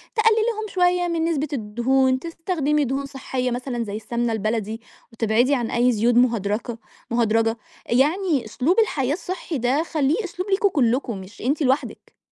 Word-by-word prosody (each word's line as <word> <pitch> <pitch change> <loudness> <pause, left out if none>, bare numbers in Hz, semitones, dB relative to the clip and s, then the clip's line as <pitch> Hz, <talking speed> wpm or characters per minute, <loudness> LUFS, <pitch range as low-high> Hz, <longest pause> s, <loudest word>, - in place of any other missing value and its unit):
تقللي 445 0 +4
لهم 435 0 -5
شوية 360 -1 +2
من 335 -1 0
نسبة 310 -3 0
الدهون، 260 +3 +1
تستخدمي 320 -2 -1
دهون 270 +2 -2
صحية 260 -2 -3
مثلًا 245 -1 -3
زي 205 -2 -5
السمنة 235 +2 -2
البلدي، 220 +1 -2 0.3
وتبعدي 230 +4 +2
عن 240 -3 -2
أي 245 +1 +3
زيوت 235 +1 +2
مهدرجة 230 -1 +1 0.3
مهدرجة 225 -1 +2 0.3
يعني 295 - +1
أسلوب 270 - +1
الحياة 285 - +1
الصحي 360 -2 -4
ده 260 +5 +1
خليه 315 +5 0
أسلوب 370 +1 -5
ليكم 395 +1 +3
كلكم، 245 - 0
مش 190 +3 -13
أنتِ 280 +6 0
لوحدِك. 265 +1 -2
260 Hz, 150 wpm, -23 LUFS, 235-325 Hz, 0.3 s, تقللي